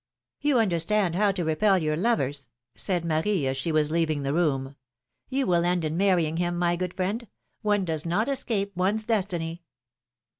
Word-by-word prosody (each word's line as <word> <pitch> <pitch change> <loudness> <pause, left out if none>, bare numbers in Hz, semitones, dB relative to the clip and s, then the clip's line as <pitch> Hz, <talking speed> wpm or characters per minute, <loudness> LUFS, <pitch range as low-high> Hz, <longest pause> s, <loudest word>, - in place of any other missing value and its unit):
You 290 -2 +2
understand 190 -2 +1
how 200 +3 +3
to 185 -2 -2
repel 190 +5 +3
your 155 -3 0
lovers," 145 - 0 0.3
said 175 -3 -1
Marie, 160 +1 0
as 130 0 0
she 135 +5 -2
was 155 -1 +2
leaving 155 -3 0
the 140 +1 -1
room. 140 -5 0 0.5
You 270 0 0
will 175 -4 +2
end 175 -1 +1
in 155 +1 -2
marrying 175 -4 +2
him, 175 0 -1
my 175 0 +2
good 180 0 -4
friend; 205 +6 -2 0.3
one 205 -3 +1
does 160 -3 -2
not 185 +7 0
escape 225 -8 -1
one's 195 +5 +1
destiny 175 -6 -1
175 Hz, 175 wpm, -26 LUFS, 160-205 Hz, 0.5 s, how